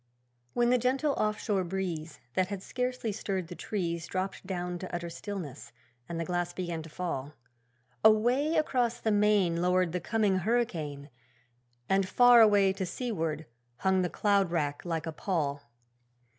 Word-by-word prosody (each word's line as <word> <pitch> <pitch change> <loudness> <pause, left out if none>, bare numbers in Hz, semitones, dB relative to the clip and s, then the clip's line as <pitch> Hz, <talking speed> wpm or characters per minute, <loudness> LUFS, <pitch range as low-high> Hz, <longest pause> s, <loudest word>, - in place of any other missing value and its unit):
When 240 0 +3
the 250 - +4
gentle 270 +4 +1
off 215 -3 0
shore 200 -3 0
breeze, 170 -3 -4
That 185 +5 +1
had 195 -1 -5
scarcely 250 -3 -2
stirred 190 -4 -3
the 175 - -7
trees, 170 -5 -3
Dropped 185 0 -4
down 180 -2 -3
to 185 - -7
utter 170 -1 -4
stillness, 170 - -7 0.4
and 170 -1 -3
the 165 - -2
glass 175 0 -2
began 175 -3 -3
to 160 - -10
fall, 150 -4 -4 0.7
Away 240 +9 +4
across 245 -6 +1
the 220 - 0
main 205 -5 +3
Lowered 180 -1 +2
the 180 +1 -2
coming 210 0 +1
hurricane, 170 -10 -1 0.8
And 195 0 +2
far 245 -1 +7
away 205 -3 +5
to 190 - -3
seaward 165 - -3 0.3
hung 190 +3 +2
the 180 - 0
cloud 200 -2 +2
wrack 150 -4 -1
like 165 -2 -2
a 160 - -3
pall. 145 -6 -2
185 Hz, 155 wpm, -30 LUFS, 170-215 Hz, 0.8 s, far